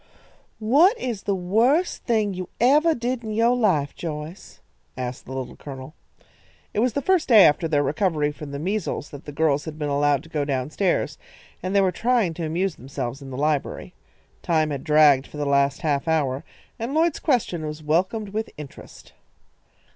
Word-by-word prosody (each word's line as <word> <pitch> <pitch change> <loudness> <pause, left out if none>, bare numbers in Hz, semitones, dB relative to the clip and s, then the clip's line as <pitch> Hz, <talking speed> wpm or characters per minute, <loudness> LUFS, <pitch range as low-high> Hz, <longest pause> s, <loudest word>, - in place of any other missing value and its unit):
"What 295 - +4
is 235 -6 -3
the 200 - -1
worst 230 - +1
thing 215 -4 +1
you 185 -1 -6
evah 300 +7 +4
did 240 0 -2
in 215 -1 -4
yo' 230 +3 +3
life, 185 -13 +1
Joyce?" 155 +1 -7 0.4
asked 125 -1 -5
the - - -10
Little 130 -1 -5
Colonel. 135 0 -9 0.8
It - - -1
was 240 0 +2
the 280 - -2
first 375 -4 +2
day 220 -6 +8
after 150 +3 +3
their 145 -2 +2
recovery 150 0 0
from 150 0 -9
the 140 - -5
measles 185 -1 -3
that 145 0 -10
the 145 - -7
girls 150 -1 +1
had 155 -1 -7
been 150 -2 -2
allowed 145 -1 +2
to 165 - -15
go 150 -2 -1
down 135 0 -2
stairs, 190 +2 0 0.4
and 185 +2 -3
they 200 - +5
were 190 -1 +2
trying 230 -5 +1
to 165 0 -4
amuse 175 +2 -1
themselves 135 0 -5
in 135 - -9
the 130 - -6
library. 150 0 -1 0.5
Time 155 -2 +1
had 140 -2 -4
dragged 150 -4 +5
for - - -11
the 145 - -2
last 140 -1 +2
half 150 -2 0
hour, 145 -4 0 0.4
and 235 +6 -3
Lloyd's 325 0 +2
question 220 - 0
was 150 +1 -7
welcomed 185 +8 0
with 215 +2 -3
interest. 150 -2 -12
160 Hz, 185 wpm, -23 LUFS, 145-220 Hz, 0.8 s, day